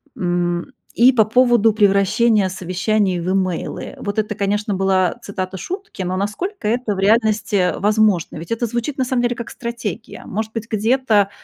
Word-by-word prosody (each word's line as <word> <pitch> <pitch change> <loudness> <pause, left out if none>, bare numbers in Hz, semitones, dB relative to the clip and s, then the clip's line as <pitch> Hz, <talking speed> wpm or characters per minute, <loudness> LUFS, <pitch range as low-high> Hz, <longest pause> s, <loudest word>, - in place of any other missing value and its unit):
М, 175 -4 -1 0.3
и 245 +3 +6
по 225 -4 +3
поводу 235 -1 +4
превращения 205 0 +3
совещаний 185 +1 0
в 170 +2 -3
имейлы. 185 -3 -2
Вот 205 0 -4
это, 210 -1 0
конечно, 205 +1 -1
была 190 -1 +2
цитата 190 -1 -5
шутки, 370 - -6
но 185 0 -2
насколько 215 - -3
это 230 -2 0
в - - -5
реальности 210 -3 +2
возможно? 210 -6 +2
Ведь 165 +5 -9
это 230 +1 0
звучит 240 +5 -3
на 260 - +1
самом 250 -1 0
деле 240 0 0
как 235 -1 -7
стратегия. 235 -2 -6
Может 220 +2 -4
быть, 225 0 -5
где-то, 220 -2 +2
210 Hz, 165 wpm, -19 LUFS, 190-235 Hz, 0.3 s, и